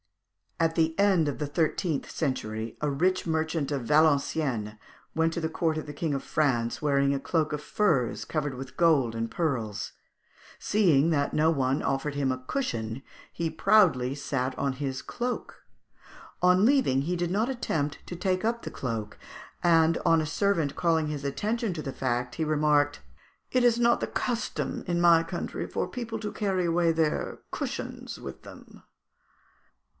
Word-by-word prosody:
At 165 -1 +2
the 160 -1 +1
end 190 -6 +4
of 145 - -2
the 150 - -1
thirteenth 160 0 -1
century, 115 -6 -3
a 150 - +1
rich 180 +7 +1
merchant 160 -2 -1
of 140 -3 -1
Valenciennes 140 -5 +2 0.4
went 160 0 +2
to 170 - -3
the 160 - -1
court 160 -1 0
of 155 - -4
the 145 - -6
King 155 +1 -2
of 135 - -3
France 120 -6 0
wearing 140 -2 +2
a 140 - -1
cloak 155 +1 0
of 150 - -3
furs 150 - 0
covered 145 -3 -2
with 130 0 -9
gold 150 -9 +3
and 115 0 -2
pearls; 115 - -2 0.6
seeing 165 -8 +3
that 145 -2 0
no 155 +1 +4
one 135 -2 +1
offered 140 +1 -1
him 140 -2 +1
a 130 - -3
cushion, 120 - -3 0.3
he 170 -1 -2
proudly 160 -7 +3
sat 130 -2 -2
on 140 -1 0
his 135 0 -4
cloak. 245 +1 -4 0.8
On 180 +3 +5
leaving 250 - +3
he 175 +4 -1
did 175 0 -1
not 215 +6 +1
attempt 155 - -2
to 175 - -6
take 185 +2 -1
up 235 +1 0
the - - -6
cloak; 115 -4 -4 0.4
and 165 -1 +4
on 165 - +4
a - - -2
servant 165 -5 0
calling 160 -2 +1
his 150 -2 -4
attention 205 - -1
to 160 - -5
the 135 -2 -5
fact 125 -1 -2
he 160 - -1
remarked, 150 -1 +2 0.5
"It 255 -1 +3
is 240 -1 +4
not 235 0 +4
the - - -2
custom 240 -2 -2
in 175 -1 0
my 170 -1 +6
country 165 - -4
for - - -2
people 230 -3 -5
to 210 -1 -4
carry 190 -4 0
away 170 0 +2
their 160 -2 -1
cushions - - -5
with - - -8
them." - - -14
155 Hz, 170 wpm, -28 LUFS, 135-175 Hz, 0.8 s, my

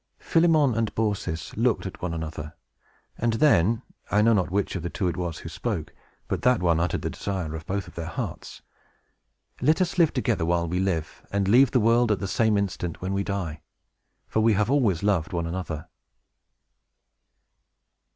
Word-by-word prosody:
Philemon 160 -6 +3
and 115 -1 0
Baucis 105 -6 -2
looked 115 -1 +1
at 95 - -7
one 90 - -2
another, 80 -1 -5 0.6
and 115 0 +1
then, 115 - +3 0.3
I 105 +1 +3
know 115 +1 +5
not 95 -4 +1
which 100 +2 -1
of 90 - -2
the 85 - -3
two 95 - -2
it 85 - -1
was 85 -3 -3
who - - -9
spoke, - - -4 0.3
but - - -2
that 125 -1 +4
one 85 -2 +2
uttered 85 0 -1
the - - -2
desire 95 -6 -4
of 80 0 -8
both 100 0 -2
their 85 -1 -5
hearts. - - -6 1.0
"Let 155 +7 +3
us 185 0 0
live 165 -3 +5
together, 120 -8 0
while 85 0 +1
we 90 +2 -1
live, 85 -5 -2
and 100 -1 0
leave 125 +5 +6
the 125 - +2
world 115 +1 +3
at 105 - +2
the 95 - -4
same 110 +2 +2
instant, 90 -4 -2
when 95 +1 -3
we 100 0 0
die! 90 -7 -4 0.7
For - - 0
we 110 0 +4
have 105 +4 +1
always 110 - +2
loved 95 -6 +1
one 85 -1 -1
another!" 85 -3 -4
100 Hz, 180 wpm, -26 LUFS, 85-115 Hz, 1.0 s, leave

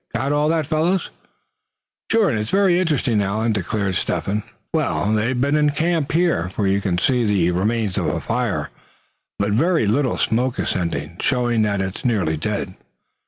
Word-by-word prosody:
Got 135 +2 0
all 150 +1 +2
that, 160 -1 +1
fellows?" 165 +5 0 1.0
"Sure, 225 -2 +4
and 110 - -1
it's 105 +1 -3
some 200 0 +3
interesting, 155 - +2
Allan," 110 +3 0
declared 100 0 -1
Step - - -1
hen. 105 +2 -1 0.3
"Well, 105 +2 0
they've 115 +4 0
been 140 +3 +2
in 150 -1 +3
camp 160 0 0
here, 165 - +1
for 100 +2 -2
you 100 +1 +2
can 90 -3 -1
see 125 +6 +2
the 95 -5 +2
remains 105 +2 0
of - - -1
a - - -1
fire, - - -2 0.7
but 100 +1 0
with 105 +3 +2
very 165 -4 +2
little 125 +4 +1
smoke 125 +2 0
ascending, 85 -2 -2
showing 120 -3 +1
that 100 -2 +1
it 95 0 -4
is - - -12
nearly 100 -10 +1
dead. 95 +3 -3
110 Hz, 180 wpm, -21 LUFS, 100-145 Hz, 1.0 s, Sure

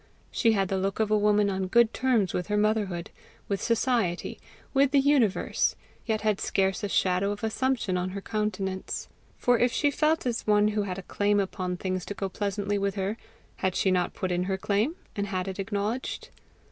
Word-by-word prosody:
She 225 -1 +3
had 195 -3 +1
the 195 - 0
look 195 +2 -2
of 215 -1 +1
a - - +5
woman 210 0 +3
on 190 -1 -2
good 235 +3 +4
terms 240 -7 +1
with 180 - -2
her 210 0 0
motherhood, 210 -5 0 0.4
with 200 -1 -2
society, 230 -6 0 0.3
with 275 0 +4
the 280 0 +4
universe 270 -8 +2 0.3
yet 220 -1 0
had 215 -2 0
scarce 190 0 0
a 205 - -1
shadow 185 +1 +2
of 205 +1 -4
assumption 220 -4 0
on 180 +1 -2
her 195 +2 -5
countenance. 195 -3 -3 0.3
For 245 -1 +3
if 245 0 +3
she 290 +4 +2
felt 310 +2 +1
as 235 -3 -2
one 210 0 +4
who 210 0 0
had 190 -2 -3
a 195 - -6
claim 205 +2 +1
upon 185 -2 -2
things 185 0 -2
to 205 - -5
go 195 - -3
pleasantly 205 +1 -2
with 200 0 -1
her, 195 +2 -1 0.4
had 185 -1 -1
she 190 - +2
not 180 -1 0
put 185 - -2
in 180 0 0
her 190 0 -1
claim, 210 - 0 0.2
and 200 -1 -2
had 185 -1 -2
it 190 0 -5
acknowledged? 205 +5 -3
205 Hz, 200 wpm, -27 LUFS, 190-220 Hz, 0.4 s, a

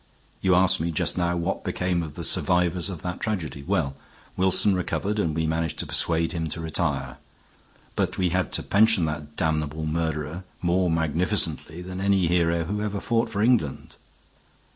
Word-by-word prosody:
You 95 -1 +3
asked 90 +1 +4
me 85 +2 -1
just 80 - 0
now 85 -1 0
what 85 +3 -2
became 90 -2 -1
of 75 -3 -7
the - - -5
survivors 90 0 +3
of 90 -5 -7
that 90 0 -4
tragedy. 80 - -3
Well, 70 0 -1 0.4
Wilson 95 +2 +4
recovered 100 +3 -1
and 80 -6 0
we 80 -1 0
managed 80 0 -1
to - - -3
persuade 80 0 +1
him 80 -2 -3
to 85 - -5
retire. 75 -5 -2 0.8
But - - -1
we 90 -1 +1
had 90 +2 -1
to - - +1
pension 105 -3 +3
that 75 -1 -5
damnable 80 -1 -1
murderer 80 +1 -2 0.2
more 90 +1 +1
magnificently 80 0 -1
than 90 +1 -6
any 100 -2 +2
hero 85 -1 +2
who 105 +5 -3
ever 105 -1 -2
fought 115 +2 0
for 105 -2 -1
England. 115 - +1
85 Hz, 170 wpm, -25 LUFS, 80-95 Hz, 0.8 s, asked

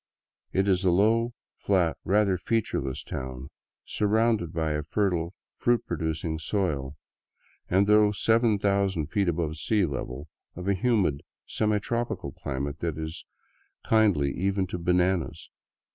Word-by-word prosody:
It 95 +1 +1
is 95 -1 +2
a 95 - +4
low, 110 +6 +3 0.3
flat, 90 -5 +1
rather 100 0 +3
featureless 90 - -1
town, 65 +1 -6 0.3
surrounded 110 -4 +1
by 80 -2 -1
a 75 0 -1
fertile, 85 +1 -1 0.2
fruit 120 -1 +1
producing 80 -1 -2
soil, 75 -6 -1 0.7
and 95 +3 +4
though 105 0 +5
7000 100 -6 +1
feet 100 -4 +1
above 80 -2 -2
sea 105 +4 +1
level, 70 -1 -5 0.3
of 90 +2 -6
a 100 - +3
humid, 95 - +1 0.2
semi 105 -1 +1
tropical 120 +3 -3
climate 70 +2 -4
that 85 -3 -2
is 80 +1 -6 0.6
kindly 100 -11 +3
even 95 +1 0
to 90 -1 -5
bananas. 90 +1 0
95 Hz, 130 wpm, -27 LUFS, 80-105 Hz, 0.7 s, though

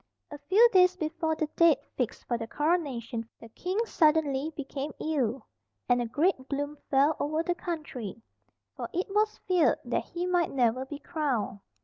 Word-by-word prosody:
A 290 - -7
few 435 +6 +7
days 365 -1 +6
before 320 0 -1
the 310 - 0
date 335 -4 +6 0.2
fixed 250 -4 -3
for 240 - -1
the 225 -1 -4
Coronation 255 -8 -1
the 230 - -12
king 365 - -4
suddenly 305 -5 +2
became 285 +1 -4
ill, 270 -6 -1 0.4
and 245 -1 +3
a 240 - -2
great 285 +1 0
gloom 285 +1 -2
fell 285 +3 +4
over 310 +3 0
the 350 - 0
country, 305 - -5 0.6
for - - -5
it 360 +2 -1
was 425 +1 +2
feared 365 -3 +4
that - - -1
he 350 +1 -4
might 355 -2 +2
never 255 0 +1
be 290 +2 -7
crowned. 280 - -2
300 Hz, 165 wpm, -29 LUFS, 260-340 Hz, 0.6 s, few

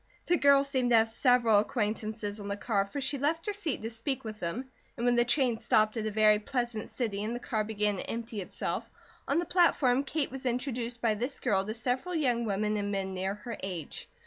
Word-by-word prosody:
The 350 - +3
girl 280 -3 +5
seemed 260 -3 0
to 240 - +5
have 225 0 +5
several 235 -2 +4
acquaintances 215 -1 -2
on 200 - -6
the 200 0 -3
car, 205 -2 0
for 200 +8 -5
she 275 +1 -1
left 320 +4 0
her 415 - -1
seat 340 - -2
to 225 - -3
speak 255 +4 -3
with 215 -2 -7
them 245 +10 -4 0.3
and 235 - -2
when 245 0 +4
the 240 - +5
train 240 -2 +1
stopped 215 -1 +2
at 220 -1 -2
a - - -2
very 215 0 +5
pleasant 240 -1 -3
city 210 -5 -2
and 225 +3 -2
the - - -4
car 220 -3 -1
began 210 -1 0
to - - -3
empty 230 -2 -4
itself, 180 - -4 0.4
on - - +1
the 345 - +1
platform 280 -8 +3
Kate 285 0 -1
was 265 0 -4
introduced 245 -1 -2
by 225 -2 +3
this 245 +6 -3
girl 195 -2 +1
to 215 - -3
several 255 +9 -1
young 245 -7 +1
women 210 +1 0
and 205 0 -2
men 190 -1 -2
near 190 +1 -2
her 230 +3 -7
age. 180 -6 -6
230 Hz, 225 wpm, -30 LUFS, 210-260 Hz, 0.4 s, girl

